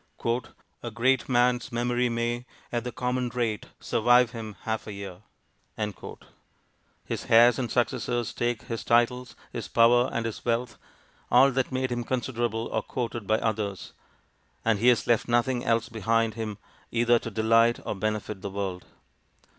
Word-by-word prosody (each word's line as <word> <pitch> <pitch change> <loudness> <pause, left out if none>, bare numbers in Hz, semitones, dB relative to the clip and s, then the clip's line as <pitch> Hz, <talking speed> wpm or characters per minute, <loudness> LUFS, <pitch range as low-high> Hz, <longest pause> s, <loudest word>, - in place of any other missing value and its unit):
'A 120 - -4
great 130 +3 +2
man's 125 0 +2
memory 120 +1 0
may, 120 +1 -1 0.3
at 120 -1 -1
the 125 - -4
common 125 0 -1
rate, 115 -4 -2
survive 120 +1 +3
him 110 -4 -7
half 110 0 -3
a 105 - -5
year.' 100 -2 -8 1.8
His - - -4
heirs 120 +2 +6
and 120 -3 -2
successors 120 -1 -1
take 120 -2 -1
his 115 -1 -5
titles, 120 +2 +1 0.2
his 115 -6 -4
power, 120 +4 +4
and 115 - -2
his 115 - -5
wealth 120 0 -1 0.5
all 130 +3 +6
that 130 0 -1
made 130 0 -1
him 120 0 -1
considerable 120 -2 -2
or - - 0
courted 120 -4 -4
by 110 - +3
others; 105 -4 -3 0.7
and 110 -3 +2
he 120 - +2
has 120 -3 +4
left 120 -2 +2
nothing 120 +1 +1
else 115 0 +1
behind 115 0 0
him 110 -2 -5 0.3
either 120 0 +3
to 115 - -6
delight 115 +2 +3
or - - -2
benefit 105 -1 -3
the 100 - -4
world. 95 -2 -4
120 Hz, 155 wpm, -27 LUFS, 110-120 Hz, 1.8 s, heirs